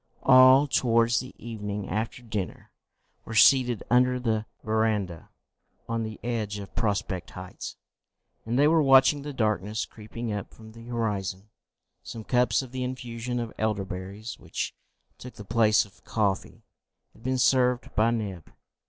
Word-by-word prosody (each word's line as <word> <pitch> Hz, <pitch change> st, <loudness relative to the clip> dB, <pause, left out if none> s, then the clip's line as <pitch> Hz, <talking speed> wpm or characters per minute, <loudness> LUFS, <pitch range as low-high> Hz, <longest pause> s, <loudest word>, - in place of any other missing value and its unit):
All, 130 Hz, +1 st, +7 dB
towards 115 Hz, -3 st, +2 dB
the 130 Hz, +1 st, -8 dB
evening 105 Hz, -3 st, -5 dB
after 110 Hz, +3 st, -3 dB
dinner, 105 Hz, -7 st, -5 dB, 0.5 s
were 110 Hz, -, -7 dB
seated 125 Hz, -1 st, +5 dB
under 125 Hz, +1 st, +4 dB
the 110 Hz, -3 st, -1 dB, 0.2 s
verandah 110 Hz, -6 st, -1 dB, 0.6 s
on 115 Hz, 0 st, -1 dB
the 110 Hz, -1 st, -5 dB
edge 110 Hz, -4 st, -2 dB
of 100 Hz, -1 st, -9 dB
Prospect 100 Hz, -4 st, -2 dB
Heights, 90 Hz, 0 st, -8 dB, 0.7 s
and 115 Hz, +2 st, -2 dB
they 145 Hz, +2 st, +5 dB
were 160 Hz, +1 st, +4 dB
watching 135 Hz, +1 st, +5 dB
the 145 Hz, +1 st, -6 dB
darkness 110 Hz, -3 st, -1 dB
creeping 110 Hz, +1 st, -7 dB
up 100 Hz, -1 st, -6 dB
from 110 Hz, -1 st, -13 dB
the 115 Hz, +1 st, -13 dB
horizon. 105 Hz, -4 st, -3 dB, 0.5 s
Some 115 Hz, -, -8 dB
cups 125 Hz, 0 st, +2 dB
of 130 Hz, -, -11 dB
the 130 Hz, 0 st, -3 dB
infusion 125 Hz, -1 st, -4 dB
of 115 Hz, -2 st, -5 dB
elder 105 Hz, -3 st, 0 dB
berries, 95 Hz, +5 st, -7 dB
which -, -, -4 dB, 0.5 s
took 125 Hz, -, -10 dB
the 105 Hz, -, -10 dB
place 110 Hz, 0 st, +3 dB
of 100 Hz, 0 st, -22 dB
coffee, 100 Hz, -4 st, -2 dB, 0.5 s
had -, -, -20 dB
been 130 Hz, +2 st, -1 dB
served 125 Hz, -1 st, +2 dB
by 110 Hz, +2 st, +3 dB
Neb. 105 Hz, -7 st, -4 dB
115 Hz, 150 wpm, -27 LUFS, 105-125 Hz, 0.7 s, All